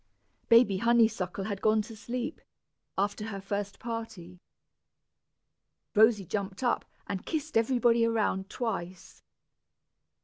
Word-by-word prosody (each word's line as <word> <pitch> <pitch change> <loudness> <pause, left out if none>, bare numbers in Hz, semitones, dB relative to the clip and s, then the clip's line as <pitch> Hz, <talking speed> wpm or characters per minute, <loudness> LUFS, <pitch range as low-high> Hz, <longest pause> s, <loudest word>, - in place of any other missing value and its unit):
Baby 230 -4 +6
Honeysuckle 220 -5 +2
had 200 -1 -4
gone 215 0 +3
to 225 +1 -10
sleep, 245 +7 -5 0.6
after 205 +2 -1
her 200 -3 -5
first 200 0 -4
party. 220 -7 -6 1.5
Rosy 215 -2 +5
jumped 195 +4 -4
up, 245 - +1 0.2
and 190 -2 -4
kissed 310 -1 -4
everybody 235 0 +3
around 215 -4 0
twice. 190 -7 -5
215 Hz, 105 wpm, -29 LUFS, 195-235 Hz, 1.5 s, Baby